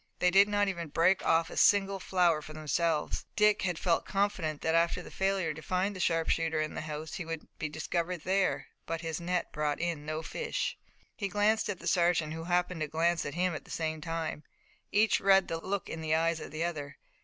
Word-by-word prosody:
They 180 - +3
did 200 +2 +6
not 205 0 +2
even 170 -4 -3
break 165 +5 +3
off 165 0 +2
a - - -7
single 195 -1 +4
flower 175 -4 +2
for 155 - -10
themselves. 155 +1 -1
Dick 210 -1 +4
had 180 -3 -1
felt 170 -1 +1
confident 195 -7 -1
that 160 - +1
after 170 +1 +2
the - - -11
failure 190 -4 0
to 155 - -9
find 185 +4 -1
the - - -7
sharpshooter 165 -1 +1
in 155 0 -2
the - - -4
house 155 0 -6
he 180 - -4
would 165 -1 -6
be 150 - -2
discovered 170 +2 -2
there, 185 -7 0 0.2
but 165 0 -3
his 165 0 -4
net 180 +1 -1
brought 150 -1 -1
in 170 -3 -2
no 155 +1 -4
fish. - - -3 0.4
He 200 - -2
glanced 210 +3 +2
at 200 - -2
the - - -12
sergeant, 170 -3 +2
who 165 0 -6
happened 180 -1 0
to 155 - 0
glance 165 +2 +1
at 145 - -6
him 180 0 +1
at 155 - -6
the - - -19
same 160 -1 -2
time. 165 -2 -3 0.5
Each 215 +1 +4
read 195 -1 +5
the 165 - -3
look 190 +2 -3
in 165 - -5
the 155 0 +1
eyes 165 0 +1
of - - -7
the 155 +1 -3
other. 145 -4 -4
165 Hz, 220 wpm, -30 LUFS, 160-185 Hz, 0.5 s, did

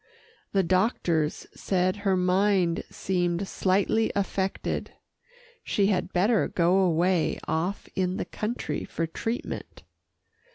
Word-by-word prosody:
The 195 -1 +2
doctors 175 -4 +1
said 185 0 0
her 195 -2 +1
mind 185 -1 +2
seemed 175 0 -1
slightly 200 +5 +1
affected 195 -1 -2 0.7
she 200 - +1
had 185 0 -2
better 205 +5 +3
go 175 +2 +2
away 175 -1 +2
off 165 +6 -1
in 185 0 0
the - - -2
country 215 -9 -3
for 165 - -3
treatment. 225 +8 -5
185 Hz, 110 wpm, -27 LUFS, 175-200 Hz, 0.7 s, better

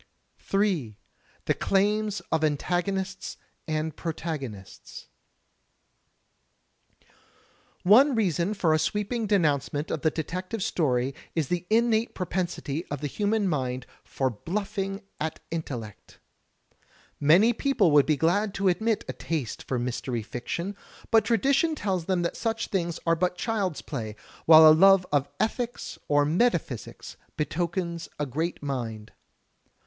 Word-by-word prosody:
J. 180 - 0 0.5
The - - +2
Claims 210 +1 +1
of 160 -1 +1
Antagonists 185 +6 -1 0.3
and 155 -1 -2
Protagonists 150 - -6 2.7
One 250 +9 +6
reason 190 -2 +1
for 170 -5 +2
a 155 - +3
sweeping 210 +6 -1
denoimcement 150 -6 +1
of 155 - -2
the 160 - +3
detective 185 +7 -4
story 135 - 0 0.2
is 160 -5 0
the 180 0 -2
innate 225 0 +2
propensity 175 -4 -3
of 145 -1 -5
the - - -3
human 205 +7 0
mind 130 -6 -2 0.2
for 130 -1 -1
bluffing 195 - -3 0.2
at 160 0 -3
intellect. 125 -10 -6 1.0
Many 180 +11 +5
people 235 - +2
would 145 -1 +5
be 155 -2 +2
glad 190 +7 +1
to 195 -1 +2
admit 220 +5 0
a - - -4
taste 150 -9 -4
for 130 - -3
mystery 120 -1 -3
fiction, 170 - -4 0.4
but 225 -2 +5
tradition 275 - +2
tells 190 - -2
them 185 -1 0
that 170 - -2
such 225 -1 -2
things 170 -4 -1
are 165 0 +3
but 180 +1 0
child's 200 -6 -2
play, 110 -7 -5 0.3
while 160 0 +10
a 155 - +9
love 190 +3 +6
of 145 -1 +1
ethics 240 +2 -2
or 145 0 +3
metaphysics 165 - -1 0.2
betokens 170 +2 -2
a 150 - -1
great 155 +5 -3
mind. 115 -6 -4
170 Hz, 125 wpm, -27 LUFS, 145-200 Hz, 2.7 s, while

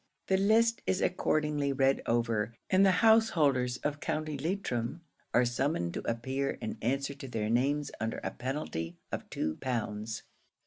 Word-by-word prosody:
The 190 - +4
list 225 +4 +3
is 190 - +2
accordingly 150 -6 +1
read 135 0 +2
over, 115 -2 0 0.2
and 190 +1 +6
the 195 - +6 0.2
householders 150 - +4
of 145 0 -1
County 155 0 -2
Leitrim 155 -3 -2 0.3
are 125 - +4
summoned 120 - 0
to - - -3
appear 130 +4 -1
and 110 - -4
answer 140 +4 0
to 140 -1 -9
their 110 -3 -2
names 140 +5 +1
under 110 0 -2
a - - -2
penalty 120 - -4
of - - -5
two 80 0 -2
pounds. 110 -3 -3
135 Hz, 150 wpm, -31 LUFS, 115-155 Hz, 0.3 s, and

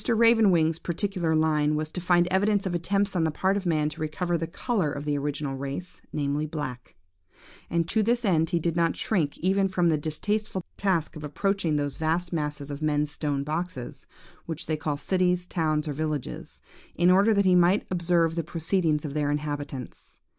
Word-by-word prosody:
Raven 230 -2 +5
wing's 165 -2 +2
particular 175 -2 -1
line 155 -1 +2
was 155 0 -2
to 180 - -4
find 175 0 +4
evidence 200 +1 +2
of 185 - -1
attempts 195 +4 0
on 170 - +2
the 160 - +2
part 190 +5 +1
of 200 -2 -2
man 155 -3 +2
to 150 - -9
recover 170 +3 -1
the 165 0 -2
colour 190 - -1
of 140 +1 -5
the 145 -1 0
original 145 -1 -2
race, 140 +6 -6
namely 145 +1 -1
black; 145 -6 -6 0.7
and 165 -1 0
to 220 - +2
this 235 +3 +1
end 165 -4 +2
he 175 - +1
did 170 0 -1
not 170 -1 +2
shrink 165 -10 0
even 195 +2 +2
from 180 -2 +1
the 155 -2 +2
distasteful 190 +5 -2
task 180 -5 0
of 155 - -8
approaching 175 +2 0
those 145 -1 -1
vast 170 +2 -1
masses 150 -2 -3
of 145 +1 -6
men's 150 -1 +1
stone 145 -3 -2
boxes, 155 -3 -5 0.4
which 165 0 -4
they 155 - 0
call 150 -1 -2
cities, 180 +3 +1
towns, 155 -3 0
or 150 - -2
villages, 155 -2 -4 0.3
in 175 +1 +4
order 200 +4 +5
that 200 -2 +3
he 185 - +5
might 180 +3 +4
observe 170 -2 +2
the 165 0 -2
proceedings 165 -1 0
of 140 - -4
their 145 -1 0
inhabitants. 145 -3 -5
165 Hz, 190 wpm, -26 LUFS, 150-185 Hz, 0.7 s, Raven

